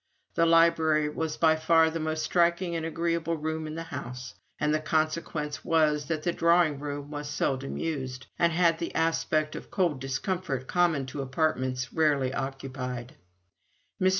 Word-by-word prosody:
The 165 Hz, 0 st, +3 dB
library 160 Hz, -2 st, +4 dB
was 160 Hz, 0 st, -3 dB
by 160 Hz, -1 st, +4 dB
far 160 Hz, 0 st, +4 dB
the 165 Hz, -, -3 dB
most 155 Hz, 0 st, -2 dB
striking 170 Hz, +1 st, +2 dB
and 165 Hz, -, -2 dB
agreeable 165 Hz, 0 st, -1 dB
room 160 Hz, +1 st, -3 dB
in 155 Hz, -, -6 dB
the 165 Hz, -, -4 dB
house; 125 Hz, -4 st, -7 dB, 0.3 s
and 150 Hz, 0 st, +1 dB
the 155 Hz, -, +2 dB
consequence 155 Hz, -1 st, -1 dB
was 155 Hz, -3 st, +2 dB
that 155 Hz, -2 st, -2 dB
the 175 Hz, -, +1 dB
drawing 170 Hz, -4 st, +3 dB
room 145 Hz, 0 st, -5 dB
was 145 Hz, 0 st, -5 dB
seldom 135 Hz, -2 st, -1 dB
used, 130 Hz, -5 st, -4 dB
and 170 Hz, 0 st, +4 dB
had 165 Hz, -1 st, +3 dB
the 170 Hz, -, -4 dB
aspect 155 Hz, -1 st, +1 dB
of -, -, -8 dB
cold 170 Hz, -9 st, 0 dB
discomfort 135 Hz, 0 st, -2 dB
common 165 Hz, -4 st, +2 dB
to 135 Hz, +2 st, -5 dB
apartments 130 Hz, -3 st, -1 dB
rarely 145 Hz, -5 st, +2 dB
occupied. 135 Hz, -2 st, -5 dB, 0.9 s
Mr. 185 Hz, -, +5 dB
155 Hz, 160 wpm, -28 LUFS, 140-165 Hz, 0.9 s, Mr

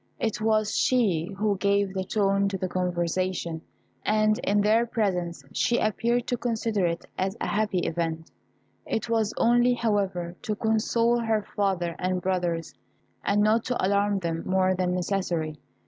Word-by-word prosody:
It 220 Hz, -1 st, -1 dB
was 215 Hz, -1 st, +1 dB
she 205 Hz, -11 st, +2 dB
who 205 Hz, -1 st, +1 dB
gave 200 Hz, -1 st, +1 dB
the 190 Hz, -1 st, -2 dB
tone 195 Hz, 0 st, +1 dB
to 195 Hz, -, -3 dB
the 185 Hz, -, -2 dB
conversation, 175 Hz, -1 st, -1 dB, 0.4 s
and 215 Hz, 0 st, +2 dB
in 205 Hz, +1 st, +2 dB
their 215 Hz, +3 st, +4 dB
presence 180 Hz, -, -1 dB
she 240 Hz, -, +2 dB
appeared 235 Hz, +3 st, +1 dB
to 245 Hz, -, -1 dB
consider 225 Hz, -5 st, 0 dB
it 170 Hz, 0 st, -3 dB
as 195 Hz, +3 st, -1 dB
a -, -, -2 dB
happy 205 Hz, -3 st, 0 dB
event; 165 Hz, -1 st, -3 dB, 0.5 s
it 220 Hz, +1 st, -3 dB
was 225 Hz, -2 st, +1 dB
only, 240 Hz, +1 st, +4 dB
however, 195 Hz, -7 st, -1 dB
to 215 Hz, -, -2 dB
console 230 Hz, +2 st, +1 dB
her 225 Hz, -2 st, 0 dB
father 185 Hz, -4 st, 0 dB
and 185 Hz, 0 st, 0 dB
brothers, 175 Hz, -2 st, -1 dB, 0.5 s
and 205 Hz, +1 st, +2 dB
not 220 Hz, +2 st, +3 dB
to 250 Hz, -6 st, 0 dB
alarm 200 Hz, +1 st, +2 dB
them 165 Hz, -3 st, -2 dB
more 185 Hz, 0 st, +2 dB
than 180 Hz, -1 st, 0 dB
necessary. 175 Hz, -5 st, -2 dB
200 Hz, 155 wpm, -26 LUFS, 180-220 Hz, 0.5 s, their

